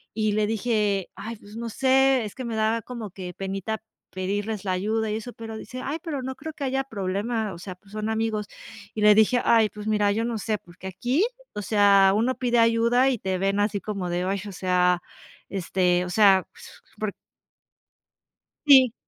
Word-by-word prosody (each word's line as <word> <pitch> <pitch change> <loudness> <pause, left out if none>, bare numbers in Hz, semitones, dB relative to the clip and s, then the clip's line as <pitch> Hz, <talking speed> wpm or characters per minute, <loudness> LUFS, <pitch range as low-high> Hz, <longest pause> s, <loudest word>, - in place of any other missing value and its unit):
Y 215 -1 +1
le 210 0 +1
dije: 210 -3 0
"Ay, 220 +4 -6
pues 205 +1 -14
no 235 0 -4
sé, 265 +1 +3
es 210 - -8
que 260 - -6
me 230 -1 -3
daba 220 +1 +1
como 230 -4 -7
que 180 -1 -7
penita 195 +4 -4 0.3
pedirles 205 +2 -3
la 190 - 0
ayuda" 215 +4 -1
y - - -1
eso, 235 +2 -7
pero 225 -1 -8
dice: 255 +3 -8
"Ay, 305 +4 -3
pero 310 -6 -4
no 260 +1 -4
creo 315 +4 -7
que 290 - -7
haya 270 0 0
problema, 210 -1 -2
o 170 - -10
sea, 185 0 -7
pues 195 +2 -23
son 215 +1 -3
amigos". 220 -1 -1 0.5
Y 215 - -3
le 210 0 +7
dije: 220 +3 +4
"Ay, 225 -2 +4
pues 210 +1 -9
mira, 210 -1 +2
yo 225 +3 0
no 235 -1 -2
sé, 215 +1 -1
porque 180 0 -12
aquí, 245 - 0 0.3
o 210 - -4
sea, 200 -2 +5
uno 240 +5 +1
pide 240 -1 0
ayuda" 230 +3 +4
y 250 -4 -1
te 190 -1 -2
ven 195 +2 0
así 205 0 +1
como 195 -3 -4
de, 175 +1 -1
ay, 195 +1 -1
o - - -6
sea, 180 -1 +2 0.5
este, 180 -1 +1
o - - -6
sea, 195 -1 +5
pues - - -15 0.2
por - - -3 1.5
sí. 260 -5 +7
215 Hz, 200 wpm, -25 LUFS, 195-235 Hz, 1.5 s, le